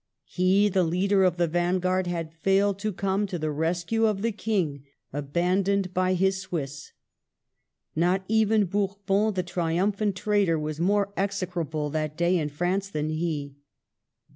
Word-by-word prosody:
He, 190 +3 +3
the 190 -2 +2
leader 190 +4 +2
of 180 -2 +2
the 175 - +3
vanguard, 180 +2 0
had 165 -2 -3
failed 195 +3 +1
to 215 +1 -1
come 195 +2 -1
to 185 - -4
the 155 -1 -2
rescue 170 +9 0
of 205 -2 -1
the 230 - +1
King, 185 -10 -2 0.3
abandoned 180 +6 0
by 185 0 +2
his 190 +1 +1
Swiss. 145 -7 -5 1.0
Not 180 +4 +2
even 220 -1 +3
Bourbon, 200 +2 0
the 185 - 0
triumphant 185 +4 0
traitor, 200 -4 +1
was 155 0 -4
more 200 +3 +1
execrable 180 -6 -2
that 155 0 -2
day 175 +1 +2
in 150 -2 -2
France 180 +6 -1
than 155 -4 -2
he. 155 -3 -3
185 Hz, 145 wpm, -26 LUFS, 165-200 Hz, 1.0 s, He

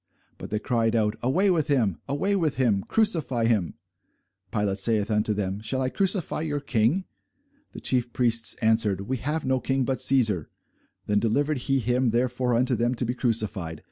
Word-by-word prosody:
But - - -8
they 105 - -1
cried 115 0 0
out, 105 -2 +1
Away 185 +11 +2
with 160 -5 +1
him, 115 - +1
away 190 +9 0
with 160 -7 0
him, 115 -7 +1
crucify 155 - +1
him. 105 -7 0 0.8
Pilate 100 -2 -1
saith 105 +1 +2
unto 105 0 +1
them, 100 -1 -2
Shall 130 +5 -2
I 130 -1 0
crucify 190 -2 -1
your 150 -2 -2
King? 135 - 0 0.7
The - - -9
chief 125 -2 0
priests 115 -2 +1
answered, 110 -3 +2
We 130 +7 -3
have 150 +6 -3
no 130 0 +1
king 135 0 0
but 130 0 -2
Cæsar. 110 - +3 0.6
Then 105 0 +1
delivered 140 +6 0
he 135 - +3
him 125 +1 +1
therefore 125 +1 0
unto 125 +2 +1
them 120 +2 0
to 125 - -2
be 120 - -1
crucified. 105 - -2
120 Hz, 175 wpm, -25 LUFS, 110-135 Hz, 0.8 s, Cæsar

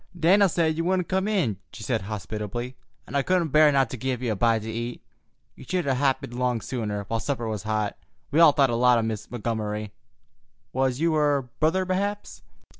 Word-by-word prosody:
"Dan'l 190 +4 +5
said 160 -2 +1
you 165 - 0
wouldn't 180 0 0
come 190 +1 0
in," 175 - 0
she - - -9
said - - -1
hospitably, 105 +4 -5 0.3
"and - - -8
I 140 - +3
couldn't 175 +1 +1
bear 150 +1 +6
not 135 -2 +3
to 130 - -5
give 130 0 -3
you 120 - 0
a - - 0
bite 115 +1 +2
to 110 - -5
eat. 120 +2 -5 0.5
You - - -12
should 185 -2 -2
'a' 135 - +2
happened 130 -2 0
'long 125 -1 0
sooner, 105 -4 -3
while 115 +3 -2
supper 120 -2 -2
was 110 -3 -3
hot. 105 -1 -1 0.4
We 150 - +2
all 165 -3 +8
thought 140 -3 +3
a - - 0
lot 125 +1 +4
o' 115 - +1
Miss 110 -2 -4
Montgomery. 105 -3 -3 0.8
Was 130 0 0
you 165 0 +2
her 145 -3 +2 0.2
brother, 170 +5 +2
perhaps?" 200 +3 -3
130 Hz, 205 wpm, -25 LUFS, 110-160 Hz, 0.8 s, all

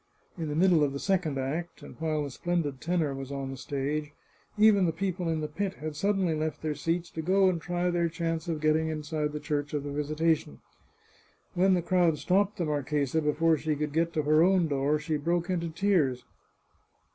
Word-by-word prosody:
In 165 -4 -4
the 150 - -3
middle 170 -2 +4
of 140 -2 0
the 140 - -4
second 180 -7 0
act, 155 +6 -4
and - - -11
while 155 -2 0
the 140 - -5
splendid 155 -3 -2
tenor 165 -4 0
was 135 0 -6
on 135 -1 -4
the - - -5
stage, 145 +3 -3 0.4
even 210 -3 +5
the - - +2
people 180 0 -2
in 160 -1 -1
the 150 - -2
pit 195 +5 -3
had 155 0 -6
suddenly 195 0 +1
left 155 0 -3
their 155 -1 0
seats 165 +4 -2
to 160 - -4
go 190 +4 +3
and 170 -3 -2
try 175 +1 -1
their 170 -1 +1
chance 165 0 -3
of 160 -3 -2
getting 155 +1 +2
inside 155 -1 -2
the 150 - -4
Church 150 -1 -2
of 145 - -2
the 145 - -5
Visitation. 150 - 0 0.9
When 185 +1 +4
the 175 - 0
crowd 175 -3 +2
stopped 195 +5 +1
the 175 - -1
marchesa 150 0 0
before 155 +2 +2
she 155 0 -1
could 150 0 -3
get 165 +1 +1
to 155 - 0
her 155 +2 +4
own 180 -1 +4
door, 145 +1 +1
she 155 0 -2
broke 170 +4 -1
into 170 -2 -1
tears. 160 -9 +1
160 Hz, 205 wpm, -28 LUFS, 150-175 Hz, 0.9 s, even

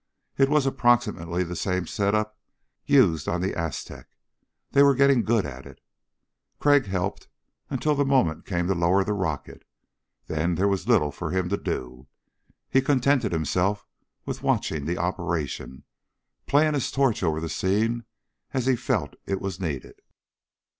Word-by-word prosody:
It 135 0 +3
was 150 -2 +3
approximately 105 -10 +1
the 90 0 -6
same 90 0 -1
setup 105 +1 0 0.5
used 80 -2 +4
on 90 - 0
the 95 +2 -1
Aztec 85 -3 -5 0.6
they 140 - +5
were 140 -1 +6
getting 140 -2 +4
good 110 -3 +1
at 65 -2 -8
it. - - -14 0.8
Crag 145 -4 +4
helped 95 0 -3 0.4
until 150 - 0
the 145 0 +2
moment 130 - +1
came 90 -2 -1
to 95 - +1
lower 90 +2 +2
the 105 - -1
rocket, 90 -8 -4 0.6
then 80 +3 -1
there 95 +4 +2
was 100 +1 -1
little 95 -12 +3
for 80 +3 -5
him 90 0 -1
to 100 - 0
do. 65 -3 -5 0.6
He 135 - +3
contented 135 -4 +2
himself 90 +5 0 0.4
with - - -5
watching 75 -3 0
the 85 - -1
operation, 85 -7 -3 0.6
playing 150 +2 +3
his 140 -4 -1
torch 135 -5 +1
over 80 -4 0
the 80 - -4
scene 110 +7 0 0.5
as 130 -2 0
he 130 -1 +3
felt - - -1
it 95 -1 -1
was 95 -2 -5
needed. 75 -8 -5
95 Hz, 155 wpm, -25 LUFS, 85-125 Hz, 0.8 s, were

